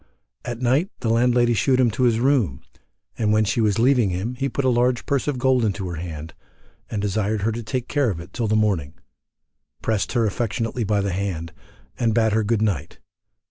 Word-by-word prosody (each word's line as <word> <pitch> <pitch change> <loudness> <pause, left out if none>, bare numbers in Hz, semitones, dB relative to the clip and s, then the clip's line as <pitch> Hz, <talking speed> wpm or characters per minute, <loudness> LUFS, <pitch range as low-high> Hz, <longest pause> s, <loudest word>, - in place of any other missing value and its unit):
At 120 +1 -5
night 135 +10 +2
the 115 - 0
landlady 120 0 +3
shewed 130 +3 +2
him 120 -3 +4
to 125 +4 +1
his 115 -2 +3
room, 120 - +1 0.6
and 105 -2 +2
when 110 0 +3
she 110 +3 0
was 105 -3 +2
leaving 120 -3 +3
him 95 +7 -3
he 135 +2 -2
put 140 - -2
a - - +4
large 120 0 +1
purse 140 0 0
of 145 -3 0
gold 130 -1 +2
into 100 -3 -1
her 85 - -5
hand, 80 -2 -7 0.6
and 105 - -3
desired 105 +1 -1
her 115 - +1
to 115 +2 -4
take 125 +2 -3
care 145 -4 +1
of 90 -6 -3
it 90 +3 -11
till 115 -3 -1
the 110 - +1
morning, 95 -9 0 0.9
pressed 110 -2 -1
her 120 -3 +2
affectionately 115 +2 -2
by 105 -1 +1
the 100 -2 -2
hand, 90 -4 -3 0.5
and 115 -2 +1
bade 110 -2 +3
her 110 0 +2
good 110 0 +1
night. 85 -8 -2
110 Hz, 210 wpm, -23 LUFS, 100-125 Hz, 0.9 s, him